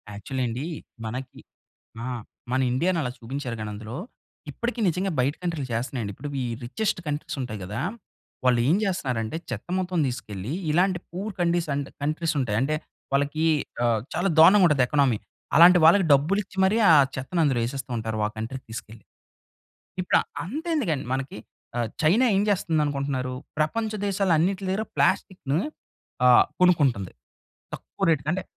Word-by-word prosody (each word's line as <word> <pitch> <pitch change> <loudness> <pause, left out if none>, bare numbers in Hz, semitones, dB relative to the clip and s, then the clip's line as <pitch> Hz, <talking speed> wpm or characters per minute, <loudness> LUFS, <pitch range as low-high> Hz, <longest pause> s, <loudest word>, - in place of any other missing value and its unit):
Actually 130 +5 -3
అండి. 125 +6 -4 0.4
మనకి 125 +4 -6 0.7
ఆ! - - -4 0.5
మన 130 - +2
ఇండియా‌ని 170 +7 +1
అలా 125 - -2
చూపించారు 125 0 -5
గానీ 110 -1 -4
అందులో, 110 +3 -7 0.5
ఇప్పటికి 240 0 -3
నిజంగా 185 +3 0
బయట 140 +4 +1
కంట్రీ‌లు 160 -7 -2
చేస్తున్నాయండి. 115 -3 -3
ఇప్పుడు 145 +6 -7
ఈ - - -2 0.2
రిచెస్ట్ 200 - -1
కంట్రీస్ 150 0 -3
ఉంటాయి 110 -4 -4
గదా! 105 +6 -4 0.6
వాళ్ళు 125 -2 +4
ఏం 170 - +4
చేస్తున్నారంటే, 130 - -2
చెత్త 120 +3 -6
మొత్తం 180 -2 -1
తీసుకెళ్ళి 110 -3 -5 0.2
ఇలాంటి 180 +3 +2
పూర్ 195 +5 -4
కండిస్ 170 -1 +1
అండ్ 140 0 -3
కంట్రీస్ 155 +2 0
ఉంటాయి. 105 -5 -1
అంటే 150 +3 0 0.4
వాళ్ళకి 145 +3 +1 0.4
ఆహ్, 115 -2 +2
చాలా 175 +4 +1
దారుణంగా 185 +4 +8
ఉంటది 145 -4 +3
ఎకనమీ. 135 -6 +2 0.4
అలాంటి 180 +2 +9
వాళ్ళకి 185 +4 +7
డబ్బులు 150 +9 +3
ఇచ్చి 190 - -18
మరి 195 +4 +3
ఆ - - +9 0.2
చెత్తని 135 +7 -2
అందులో 135 -5 +2
యేసేస్తూంటారు 120 -4 -3
ఆ - - -1
కంట్రీ‌కి 115 +4 -5
తీసుకెళ్ళి. 110 -2 -9 1.0
ఇప్పుడు 180 - +2
ఆహ్, - - -21 0.2
అంతెందుకండి 255 - -1
మనకి 135 -3 -4 0.4
ఆహ్, 120 -2 0 0.2
చైనా 220 +12 +5
ఏం 195 - +3
చేస్తుంది 170 -5 +1
అనుకుంటున్నారు? 140 -3 -2 0.2
ప్రపంచ 215 +9 0 0.2
దేశాలు 195 -3 +2
అన్నిట్ల 190 +4 0
దగ్గర 210 +3 -1
ప్లాస్టిక్‌ని 160 -5 +1 0.7
ఆహ్, 125 - +7 0.2
కొనుక్కుంటుంది 135 - +3 0.6
తక్కువ - - -3
రేట్‌కి. 155 -1 +1
అంటే 190 0 -2
145 Hz, 150 wpm, -25 LUFS, 125-180 Hz, 1.0 s, అలాంటి